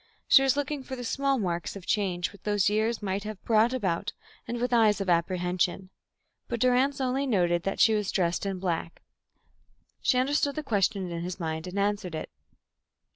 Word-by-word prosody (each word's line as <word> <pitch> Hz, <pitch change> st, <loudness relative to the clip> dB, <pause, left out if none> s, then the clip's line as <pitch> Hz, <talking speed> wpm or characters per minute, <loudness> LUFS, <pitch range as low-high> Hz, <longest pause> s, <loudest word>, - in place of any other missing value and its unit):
She 270 Hz, -, +7 dB
was 270 Hz, 0 st, +2 dB
looking 290 Hz, 0 st, -2 dB
for 260 Hz, 0 st, -6 dB
the 245 Hz, -, -7 dB
small 275 Hz, +3 st, 0 dB
marks 175 Hz, -5 st, -2 dB
of 195 Hz, -3 st, -9 dB
change 185 Hz, -4 st, 0 dB
which 200 Hz, -, -16 dB
those 205 Hz, -2 st, +1 dB
three 210 Hz, -, +2 dB
years 220 Hz, 0 st, 0 dB
might 195 Hz, 0 st, -2 dB
have 215 Hz, -2 st, -6 dB
brought 225 Hz, +1 st, +3 dB
about, 205 Hz, -5 st, -1 dB, 0.3 s
and 240 Hz, 0 st, -3 dB
with 245 Hz, +1 st, -1 dB
eyes 220 Hz, -3 st, +4 dB
of 195 Hz, -2 st, 0 dB
apprehension. 180 Hz, +2 st, 0 dB, 0.6 s
But 235 Hz, -, -3 dB
Durrance 255 Hz, +4 st, +2 dB
only 265 Hz, +1 st, 0 dB
noticed 175 Hz, -7 st, +1 dB
that 195 Hz, -, -2 dB
she 225 Hz, -, +6 dB
was 210 Hz, -2 st, 0 dB
dressed 175 Hz, -2 st, 0 dB
in 195 Hz, -1 st, -2 dB
black. 170 Hz, -2 st, -3 dB, 1.0 s
She 255 Hz, -, +2 dB
understood 280 Hz, +2 st, +1 dB
the 310 Hz, -, -3 dB
question 200 Hz, -6 st, 0 dB
in 170 Hz, 0 st, -4 dB
his 180 Hz, +1 st, -5 dB
mind 160 Hz, 0 st, -3 dB
and 180 Hz, +2 st, -6 dB
answered 200 Hz, -3 st, -1 dB
it. 155 Hz, -, -6 dB
205 Hz, 190 wpm, -28 LUFS, 180-245 Hz, 1.0 s, She